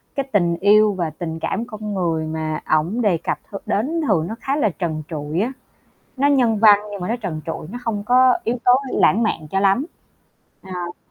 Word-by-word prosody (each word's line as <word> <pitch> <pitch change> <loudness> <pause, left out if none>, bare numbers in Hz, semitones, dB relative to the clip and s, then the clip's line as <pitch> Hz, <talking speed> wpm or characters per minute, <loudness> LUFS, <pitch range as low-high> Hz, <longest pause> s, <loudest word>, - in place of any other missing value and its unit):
cái 275 - 0
tình 170 -4 +2
yêu 210 +2 +5
và 175 -4 -2
tình 160 +1 -6
cảm 230 - -2
con 215 -3 -6
người 165 -4 -1
mà 155 -1 -3 0.2
ổng 175 +10 0
đề 200 -7 +2
cập 165 - -3
th - - -8
đến 300 +11 -1
thường 170 -6 +2
nó 220 - -5
khá 275 - -1
là 285 -8 +2
trần 160 -4 -4
trụi 155 +1 -3
á, 235 +5 -1 0.7
nó 280 +2 +3
nhân 245 -6 +3
văn 210 -2 +7
nhưng 200 -2 -6
mà 180 - -3
nó 230 - +1
trần 185 -10 -5
trụi, 160 -1 -5
nó 245 - -6
không 210 -3 -2
có 255 +2 +5
yếu 235 +2 -1
tố 245 - +7 0.2
lãng 225 +4 +3
mạn 160 -8 -2
cho 195 - +1
lắm. 200 +8 +2 0.8
À. 180 -2 -6
200 Hz, 210 wpm, -21 LUFS, 165-230 Hz, 0.8 s, văn